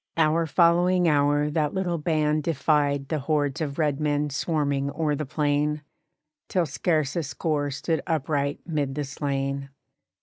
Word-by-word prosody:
Hour 160 Hz, +1 st, +3 dB
following 175 Hz, +2 st, +3 dB
hour 145 Hz, 0 st, +2 dB
that 150 Hz, 0 st, 0 dB
little 175 Hz, -3 st, -1 dB
band 155 Hz, -1 st, +1 dB
defied 145 Hz, -2 st, +1 dB
The 155 Hz, -, 0 dB
hordes 145 Hz, +1 st, 0 dB
of 140 Hz, -3 st, -3 dB
red 150 Hz, -3 st, +1 dB
men 150 Hz, -1 st, 0 dB
swarming 140 Hz, -2 st, 0 dB
o'er 150 Hz, +1 st, -1 dB
the 150 Hz, 0 st, -4 dB
plain, 150 Hz, +1 st, 0 dB, 0.7 s
Till 180 Hz, -3 st, +1 dB
scarce 155 Hz, 0 st, 0 dB
a 170 Hz, -, +1 dB
score 145 Hz, -1 st, -2 dB
stood 150 Hz, +3 st, -2 dB
upright 145 Hz, -2 st, -1 dB
'mid 145 Hz, -5 st, -2 dB
the 150 Hz, -, -1 dB
slain. 140 Hz, -1 st, -3 dB
150 Hz, 145 wpm, -25 LUFS, 140-160 Hz, 0.7 s, Hour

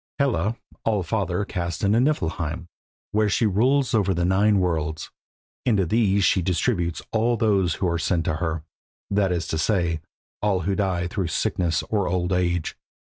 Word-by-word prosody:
Hela 115 Hz, -, +1 dB, 0.3 s
All 105 Hz, -4 st, +1 dB
father 95 Hz, +1 st, -1 dB
cast 85 Hz, -4 st, -4 dB
into 105 Hz, +3 st, +3 dB
Niflheim, 85 Hz, -, -1 dB, 0.5 s
where 105 Hz, 0 st, +2 dB
she 110 Hz, -, +2 dB
rules 125 Hz, +7 st, +2 dB
over 100 Hz, -4 st, +2 dB
nine 95 Hz, +4 st, +3 dB
worlds. 80 Hz, -3 st, -2 dB, 0.5 s
Into 105 Hz, -6 st, +2 dB
these 100 Hz, +1 st, +2 dB
she 95 Hz, -, +3 dB
distributes 85 Hz, -1 st, 0 dB
all 115 Hz, +2 st, +1 dB
those 100 Hz, -7 st, +2 dB
who 95 Hz, -, -1 dB
are 85 Hz, -1 st, 0 dB
sent 80 Hz, +2 st, 0 dB
to 75 Hz, -, 0 dB
her, 80 Hz, -2 st, -2 dB, 0.5 s
that 100 Hz, -2 st, +2 dB
is 85 Hz, -1 st, -1 dB
to 80 Hz, -, -1 dB
say, 85 Hz, -3 st, +1 dB, 0.4 s
all 100 Hz, -3 st, +1 dB
who 95 Hz, +4 st, 0 dB
die 95 Hz, -4 st, 0 dB
through 95 Hz, 0 st, -2 dB
sickness 85 Hz, 0 st, 0 dB
or 105 Hz, -4 st, -1 dB
old 90 Hz, +1 st, 0 dB
age. 85 Hz, -2 st, 0 dB
95 Hz, 160 wpm, -24 LUFS, 85-105 Hz, 0.5 s, into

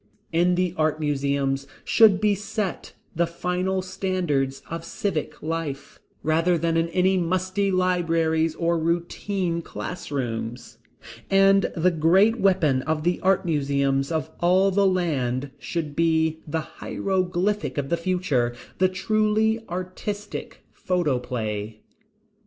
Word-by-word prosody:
In 175 Hz, +2 st, +3 dB
the 180 Hz, -1 st, 0 dB
art 155 Hz, 0 st, +1 dB
museums 140 Hz, -2 st, 0 dB, 0.2 s
should 215 Hz, -5 st, +6 dB
be 210 Hz, 0 st, +3 dB
set 205 Hz, -1 st, -4 dB, 0.2 s
the 170 Hz, +1 st, +2 dB
final 180 Hz, +2 st, -1 dB
standards 180 Hz, -8 st, -1 dB
of 165 Hz, 0 st, -5 dB
civic 165 Hz, -1 st, -3 dB
life, 155 Hz, -4 st, -4 dB, 0.2 s
rather 165 Hz, +3 st, +2 dB
than 165 Hz, 0 st, 0 dB
in 165 Hz, 0 st, +2 dB
any 185 Hz, +2 st, +2 dB
musty 185 Hz, +3 st, 0 dB
libraries 165 Hz, -3 st, +1 dB
or 170 Hz, 0 st, +1 dB
routine 170 Hz, +2 st, -1 dB
classrooms. 125 Hz, -9 st, -5 dB, 0.5 s
And 195 Hz, 0 st, +4 dB
the 180 Hz, +3 st, +3 dB
great 185 Hz, +8 st, +4 dB
weapon 155 Hz, -9 st, +3 dB
of 155 Hz, +2 st, -2 dB
the 175 Hz, +2 st, +1 dB
art 190 Hz, 0 st, +2 dB
museums 140 Hz, -2 st, 0 dB
of 160 Hz, -1 st, -2 dB
all 185 Hz, +3 st, +4 dB
the 200 Hz, +1 st, +3 dB
land 140 Hz, -8 st, 0 dB
should 155 Hz, -2 st, -4 dB
be 160 Hz, -1 st, +2 dB
the 160 Hz, +2 st, -1 dB
hieroglyphic 190 Hz, +3 st, -2 dB
of 140 Hz, -1 st, -2 dB
the 170 Hz, -, +2 dB
future, 165 Hz, -9 st, 0 dB, 0.2 s
the 185 Hz, 0 st, +4 dB
truly 215 Hz, +3 st, +1 dB
artistic 185 Hz, +4 st, -5 dB
photoplay. 125 Hz, -, -2 dB
170 Hz, 120 wpm, -24 LUFS, 150-185 Hz, 0.5 s, should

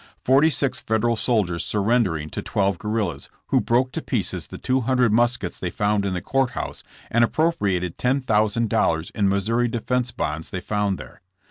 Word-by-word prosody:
Forty 135 Hz, +5 st, +5 dB
six 140 Hz, -2 st, 0 dB
Federal 110 Hz, +2 st, +1 dB
soldiers 105 Hz, -8 st, +1 dB
surren 115 Hz, +4 st, +2 dB
dering 80 Hz, -6 st, -4 dB
to -, -, -4 dB
twelve 100 Hz, -3 st, 0 dB
guerrillas, 105 Hz, -9 st, -2 dB, 0.2 s
who -, -, +3 dB
broke 125 Hz, +2 st, +1 dB
to -, -, -4 dB
pieces -, -, -2 dB
the -, -, -9 dB
two 130 Hz, +1 st, 0 dB
hundred 125 Hz, -2 st, +2 dB
muskets 120 Hz, -5 st, +1 dB
they 90 Hz, -, -2 dB
found 105 Hz, +2 st, 0 dB
in 95 Hz, -, -2 dB
the 90 Hz, -, -4 dB
court 135 Hz, -2 st, +1 dB
house -, -, -5 dB, 0.3 s
and 115 Hz, +1 st, +4 dB
appropriated 100 Hz, -, 0 dB
$10,000 110 Hz, -, +1 dB
in 100 Hz, -2 st, +1 dB
Missouri 115 Hz, +5 st, +1 dB
defence 120 Hz, +2 st, -1 dB
bonds 80 Hz, -8 st, -4 dB
they 95 Hz, -, -4 dB
found 100 Hz, 0 st, -1 dB
there. -, -, -12 dB
110 Hz, 170 wpm, -23 LUFS, 95-125 Hz, 0.3 s, Forty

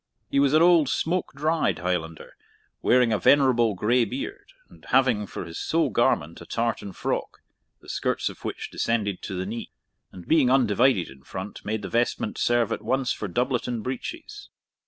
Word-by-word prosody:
He 140 Hz, -, +2 dB
was 140 Hz, +1 st, +3 dB
an 160 Hz, -, +6 dB
old 170 Hz, -5 st, +5 dB
smoke 175 Hz, +7 st, -1 dB
dried 155 Hz, +3 st, +1 dB
Highlander, 85 Hz, -2 st, -4 dB, 0.5 s
wearing 125 Hz, -2 st, +4 dB
a 105 Hz, -, +1 dB
venerable 125 Hz, -6 st, +4 dB
grey 120 Hz, +6 st, +2 dB
beard, 395 Hz, -, -6 dB, 0.2 s
and -, -, -19 dB
having 120 Hz, -6 st, +2 dB
for -, -, -6 dB
his 80 Hz, -, -7 dB
sole 160 Hz, -5 st, +1 dB
garment 85 Hz, -4 st, +1 dB
a -, -, -9 dB
tartan 115 Hz, -3 st, -2 dB
frock, -, -, -3 dB, 0.4 s
the -, -, -18 dB
skirts -, -, -1 dB
of -, -, -7 dB
which -, -, -5 dB
descended 105 Hz, -5 st, -1 dB
to 95 Hz, -, -5 dB
the 90 Hz, +1 st, -3 dB
knee, 115 Hz, +4 st, -5 dB, 0.4 s
and, 90 Hz, -2 st, -12 dB
being 155 Hz, -6 st, +4 dB
undivided 125 Hz, -5 st, +3 dB
in 65 Hz, 0 st, -15 dB
front, 95 Hz, +8 st, -8 dB
made 105 Hz, 0 st, -3 dB
the -, -, -3 dB
vestment 120 Hz, -2 st, -1 dB
serve 120 Hz, -2 st, +2 dB
at -, -, -2 dB
once 130 Hz, -1 st, 0 dB
for 105 Hz, -, -3 dB
doublet 125 Hz, +6 st, -1 dB
and 120 Hz, -3 st, -3 dB
breeches. 130 Hz, 0 st, -6 dB
120 Hz, 175 wpm, -25 LUFS, 100-135 Hz, 0.5 s, an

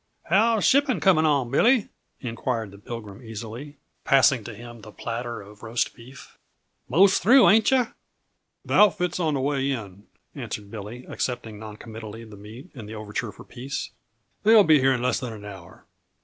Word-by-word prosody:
"How's 220 Hz, +4 st, +2 dB
shipping 270 Hz, -, +3 dB
coming 160 Hz, -2 st, +4 dB
on, 140 Hz, -5 st, +1 dB
Billy?" 235 Hz, -, +3 dB, 0.3 s
inquired 115 Hz, -3 st, -3 dB
the 100 Hz, -, -14 dB
Pilgrim 105 Hz, -2 st, -8 dB
easily, 115 Hz, +5 st, -8 dB, 0.3 s
passing 135 Hz, -3 st, +4 dB
to -, -, -7 dB
him 120 Hz, +1 st, -11 dB
the 105 Hz, -, -12 dB
platter 115 Hz, 0 st, -5 dB
of 105 Hz, +1 st, -16 dB
roast 115 Hz, +1 st, -2 dB
beef. 125 Hz, +3 st, -15 dB, 0.5 s
"Most 190 Hz, +7 st, +4 dB
through, 245 Hz, +7 st, +6 dB
ain't 220 Hz, +1 st, +5 dB
yuh?" 255 Hz, -3 st, +1 dB, 0.7 s
"The -, -, -4 dB
outfit's 180 Hz, -4 st, +3 dB
on 160 Hz, -4 st, 0 dB
the -, -, -1 dB
way 140 Hz, 0 st, 0 dB
in," 100 Hz, -7 st, -6 dB, 0.3 s
answered 100 Hz, -1 st, -7 dB
Billy, 115 Hz, +3 st, -8 dB
accepting 115 Hz, -4 st, -4 dB
noncommittally 110 Hz, +1 st, -9 dB
the 110 Hz, -2 st, -12 dB
meat 110 Hz, -, -12 dB
and 110 Hz, -7 st, -10 dB
the 110 Hz, -, -7 dB
overture 105 Hz, -1 st, -5 dB
for -, -, -14 dB
peace. 135 Hz, +3 st, -6 dB, 0.5 s
"They'll 220 Hz, 0 st, +7 dB
be 155 Hz, -4 st, +5 dB
here 135 Hz, 0 st, +3 dB
in 125 Hz, -1 st, -2 dB
less 125 Hz, -, +1 dB
than 125 Hz, -3 st, -5 dB
an 105 Hz, -1 st, -10 dB
hour." 95 Hz, -4 st, -12 dB
120 Hz, 170 wpm, -25 LUFS, 110-155 Hz, 0.7 s, They'll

